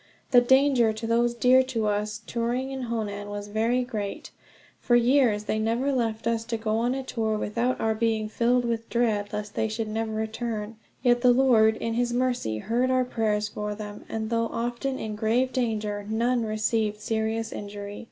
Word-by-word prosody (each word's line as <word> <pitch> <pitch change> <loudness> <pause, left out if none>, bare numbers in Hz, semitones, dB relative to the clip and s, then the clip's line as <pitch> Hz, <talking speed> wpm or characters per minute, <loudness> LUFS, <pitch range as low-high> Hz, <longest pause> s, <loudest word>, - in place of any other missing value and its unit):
The 245 -2 +7
danger 265 -2 +4
to 215 +1 -6
those 235 +1 +2
dear 250 +2 +5
to 235 -4 -2
us, 210 0 -1
touring 245 +3 -2
in 260 -3 -5
Honan, 205 -3 -3
was 205 0 -6
very 230 +4 +1
great. 215 -5 -5 0.5
For 240 - +2
years 240 -3 +3
they 215 - -1
never 230 +5 0
left 225 -3 -1
us 230 -1 0
to 230 0 -2
go 220 0 -1
on 245 +2 +1
a 270 - -3
tour 220 -4 -1
without 235 +5 -1
our 220 0 +1
being 220 -1 0
filled 240 +3 +1
with 230 -1 -2
dread 215 -4 0
lest 210 -1 -5
they 220 - 0
should 220 0 -3
never 220 +1 -2
return; 220 0 -4 0.3
yet 240 -1 +4
the 250 -1 +6
Lord, 235 -4 +4
in 230 - -2
his 240 +1 0
mercy, 245 - 0
heard 235 - 0
our 255 -1 +2
prayers 215 -3 0
for 210 0 -4
them; 210 -1 -8
and 220 0 -3
though 230 0 +1
often 240 +4 -3
in 215 -1 -4
grave 235 +5 +1
danger, 215 -4 -1
none 235 +2 +1
received 215 0 0
serious 225 +1 -2
injury. 205 0 -7
225 Hz, 185 wpm, -26 LUFS, 215-245 Hz, 0.5 s, The